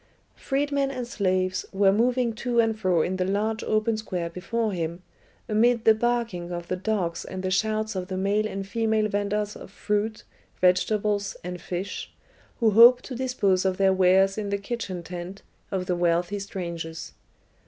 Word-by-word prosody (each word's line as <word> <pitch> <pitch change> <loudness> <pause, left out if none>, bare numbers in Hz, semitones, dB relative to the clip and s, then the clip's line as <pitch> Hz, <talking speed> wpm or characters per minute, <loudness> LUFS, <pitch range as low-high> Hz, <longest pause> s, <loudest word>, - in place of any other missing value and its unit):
Freedmen 280 0 0
and 255 -3 -4
slaves 185 -4 0
were 195 0 +4
moving 240 +2 +1
to 240 +2 -1
and 225 -1 +3
fro 180 -6 +2
in 185 +1 -2
the 185 - +1
large 210 +4 -1
open 215 +1 +1
square 180 -6 -4
before 220 +5 -2
him, 170 -1 -4 0.4
amid 230 +2 +2
the 220 - +8
barking 225 -6 -1
of 175 0 -5
the 185 - 0
dogs 185 -3 -2
and 185 0 -6
the 185 - -1
shouts 215 +2 0
of 185 -1 -3
the 190 -1 -4
male 205 +3 +1
and 195 -2 -5
female 220 0 +1
venders 205 +1 -1
of - - -10
fruit, 210 +2 -2 0.4
vegetables, 200 +2 +1
and 180 0 -6
fish, 185 +3 -5 0.5
who 225 -3 +4
hoped 240 +4 +7
to 255 - -6
dispose 235 -7 +1
of 190 -1 0
their 195 -1 +4
wares 190 +2 +4
in 205 -1 -3
the 200 - 0
kitchen 200 -4 -5
tent 180 +2 -7 0.3
of 190 -2 -2
the 180 - 0
wealthy 175 +3 +1
strangers. 170 -4 -6
200 Hz, 170 wpm, -26 LUFS, 185-220 Hz, 0.5 s, the